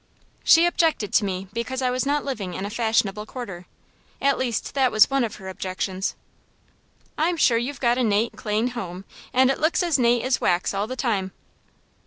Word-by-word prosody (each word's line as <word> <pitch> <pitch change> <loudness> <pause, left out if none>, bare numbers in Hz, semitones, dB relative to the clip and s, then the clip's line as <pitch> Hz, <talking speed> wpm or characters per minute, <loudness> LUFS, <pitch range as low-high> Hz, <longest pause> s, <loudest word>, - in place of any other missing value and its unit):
"She 330 +1 +6
objected 325 - +1
to 210 - +4
me 190 0 -4
because 250 +3 -3
I 255 -1 +1
was 255 +2 -1
not 290 +1 0
living 205 -10 -4
in 190 - -4
a 205 - -5
fashionable 215 -2 0
quarter 195 -9 -8 0.5
at 275 0 +2
least 240 -4 -2
that 265 -2 +2
was 215 +4 +5
one 275 -1 +2
of 225 - -3
her 190 -2 -10
objections." 190 +1 -3 1.0
"I'm 335 +2 +1
sure 235 -7 +4
you've 250 +2 -4
got 240 0 +2
a - - +2
nate, 220 +1 +1
clane 215 +3 -1
home, 195 -6 -6 0.3
and 260 +1 +4
it - - -3
looks 315 +4 +2
as 335 -5 +1
nate 240 -1 +3
as 255 0 0
wax 175 +2 +1
all 200 +2 -1
the 255 - -5
time." 200 -8 -1
235 Hz, 195 wpm, -24 LUFS, 200-260 Hz, 1.0 s, She